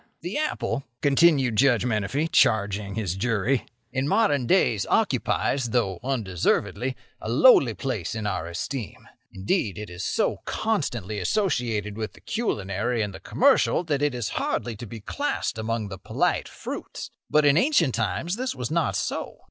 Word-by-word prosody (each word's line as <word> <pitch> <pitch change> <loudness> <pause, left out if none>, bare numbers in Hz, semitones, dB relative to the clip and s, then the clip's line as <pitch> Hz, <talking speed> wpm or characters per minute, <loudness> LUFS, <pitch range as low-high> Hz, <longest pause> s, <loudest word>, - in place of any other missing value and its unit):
"The 175 +4 -5
apple," 305 - -2 0.2
continued 140 -5 +4
Judge 125 -2 +4
Menefee, 120 +7 0
charging 100 -8 +2
his 100 -6 -2
jury, 115 +4 0 0.2
"in 135 +1 -1
modern 170 - +2
days - - +2
occupies, 130 -4 +1
though 105 -6 0
undeservedly, 125 +1 0 0.3
a - - -5
lowly - - +6
place 115 - -3
in 110 -2 -4
our 100 -5 -2
esteem. 115 +6 -5 0.2
Indeed, 100 - -1
it 105 -4 -7
is 90 - -6
so - - 0
constantly 120 - -2
associated 110 - 0
with 110 -1 -4
the - - -17
culinary 110 - -1
and 105 -2 -4
the 95 - -9
commercial 165 - +3
that 145 -4 -1
it 145 -3 +1
is 120 -4 -2
hardly 120 -2 -2
to 120 +2 -8
be 110 +1 -9
classed 200 - -2
among 110 -1 -2
the 95 -1 -7
polite - - 0
fruits. - - -7 0.2
But 150 0 +4
in 145 -1 +5
ancient 175 - +3
times 115 - -1
this 255 - -2
was 125 0 -4
not 165 -2 +1
so. - - -3
120 Hz, 155 wpm, -25 LUFS, 105-145 Hz, 0.3 s, lowly